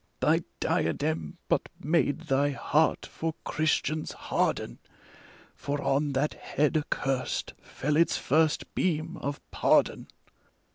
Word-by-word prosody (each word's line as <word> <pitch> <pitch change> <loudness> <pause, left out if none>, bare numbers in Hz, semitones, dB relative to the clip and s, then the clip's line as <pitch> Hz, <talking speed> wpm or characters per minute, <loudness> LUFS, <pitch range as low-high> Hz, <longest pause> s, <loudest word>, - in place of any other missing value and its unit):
Thy - - +3 0.2
diadem 80 -1 -1
but - - +1
made 150 0 +1
thy 145 -3 +2
heart 150 +2 +1
for 160 -1 -4
Christians 155 0 0
harden, - - -1 0.7
For 145 +1 -3
on 140 +1 +1
that 140 +3 +1
head 150 +2 0
accurst 135 -3 -1
fell 150 +2 -2
its 170 +2 +3
first 155 +2 +1
beam 165 -1 0
of 140 0 -4
pardon. - - +2
150 Hz, 110 wpm, -28 LUFS, 140-155 Hz, 0.7 s, Thy